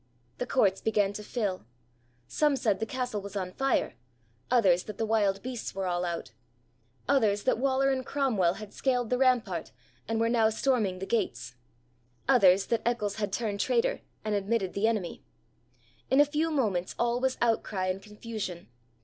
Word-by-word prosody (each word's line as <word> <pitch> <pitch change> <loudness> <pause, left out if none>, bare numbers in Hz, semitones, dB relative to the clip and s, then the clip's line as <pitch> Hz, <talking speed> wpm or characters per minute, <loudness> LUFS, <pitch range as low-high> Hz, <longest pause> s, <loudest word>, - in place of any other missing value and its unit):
The 250 - -2
courts 195 -8 +2
began 205 -2 +1
to 210 - -6
fill. 205 - -3 0.6
Some 295 - +2
said 215 -7 +1
the 225 - -2
castle 250 -5 -3
was 200 0 -9
on 185 -2 -3
fire; 270 +6 0 0.6
others, 190 -8 +4
that 210 - -7
the 225 - 0
wild 205 -3 +1
beasts 250 -5 -5
were 195 -1 -2
all 175 0 -1
out; 170 -1 -4 0.8
others, 215 -7 +2
that 255 - +1
Waller 270 +1 +2
and 260 -1 -1
Cromwell 225 -11 +1
had 215 -2 -9
scaled 250 -3 0
the 250 - +2
rampart, 230 -10 +1 0.4
and 225 0 -1
were 230 - +2
now 230 -2 +3
storming 220 -5 0
the 190 - -5
gates; 120 - -2 0.7
others, 195 -7 +5
that 230 - 0
Eccles 215 -4 -1
had 205 -2 -2
turned 205 -1 -2
traitor - - +1 0.2
and 215 - 0
admitted 200 -1 0
the 200 +3 +1
enemy. 210 -7 -2 0.9
In 265 - +4
a 290 - +8
few 305 +3 0
moments 210 - 0
all 240 +1 +1
was 260 0 0
outcry 220 -5 0
and 185 +1 -2
confusion. 210 - -7
220 Hz, 170 wpm, -29 LUFS, 195-250 Hz, 0.9 s, a